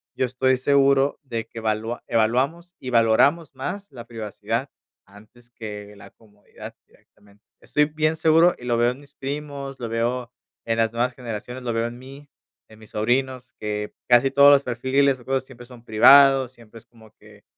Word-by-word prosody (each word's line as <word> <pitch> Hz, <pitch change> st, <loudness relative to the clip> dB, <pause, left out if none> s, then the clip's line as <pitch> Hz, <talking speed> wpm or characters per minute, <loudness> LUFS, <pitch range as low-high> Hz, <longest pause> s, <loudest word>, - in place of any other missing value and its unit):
yo -, -, 0 dB
estoy 130 Hz, +1 st, +1 dB
seguro 140 Hz, +1 st, +2 dB
de 115 Hz, -4 st, -5 dB
que 115 Hz, -, -9 dB
valua 110 Hz, +2 st, -3 dB
evaluamos 135 Hz, +11 st, 0 dB
y 130 Hz, -, -7 dB
valoramos 125 Hz, +8 st, +3 dB
más 195 Hz, +10 st, -6 dB
la 120 Hz, -4 st, -10 dB
privacidad 110 Hz, -3 st, -4 dB, 0.4 s
antes 110 Hz, +4 st, -19 dB
que 105 Hz, -3 st, -9 dB
la -, -, -14 dB
comodidad 105 Hz, -2 st, -14 dB
directamente, 100 Hz, 0 st, -26 dB, 0.2 s
estoy 150 Hz, 0 st, +1 dB
bien 155 Hz, +1 st, -1 dB
seguro 165 Hz, +2 st, +4 dB
y -, -, -15 dB
lo 120 Hz, -1 st, 0 dB
veo 120 Hz, +1 st, +2 dB
en 125 Hz, -, -10 dB
mis 140 Hz, -1 st, -20 dB
primos, 140 Hz, -1 st, -6 dB
lo 120 Hz, -2 st, -5 dB
veo 120 Hz, +1 st, -2 dB, 0.3 s
en 115 Hz, 0 st, -1 dB
las 115 Hz, 0 st, +1 dB
nuevas 125 Hz, +2 st, -1 dB
generaciones, 125 Hz, +1 st, -7 dB
lo 120 Hz, -2 st, -2 dB
veo 115 Hz, +1 st, -1 dB
en 120 Hz, +1 st, -9 dB
mí, 135 Hz, +2 st, -13 dB, 0.4 s
en 110 Hz, 0 st, -17 dB
mis 110 Hz, -, -16 dB
sobrinos, 130 Hz, +3 st, -1 dB
que 105 Hz, 0 st, -4 dB, 0.2 s
casi 120 Hz, +2 st, +5 dB
todos 140 Hz, +1 st, +7 dB
los 140 Hz, -1 st, +4 dB
perfiles 130 Hz, +2 st, 0 dB
o 120 Hz, -, -17 dB
cosas 135 Hz, 0 st, -1 dB
siempre 120 Hz, -1 st, -14 dB
son 120 Hz, -1 st, -15 dB
privados, 135 Hz, +3 st, +6 dB
siempre 115 Hz, -2 st, -17 dB
es -, -, -24 dB
como 110 Hz, -2 st, -20 dB
que, 105 Hz, -1 st, -19 dB
125 Hz, 180 wpm, -23 LUFS, 115-135 Hz, 0.4 s, todos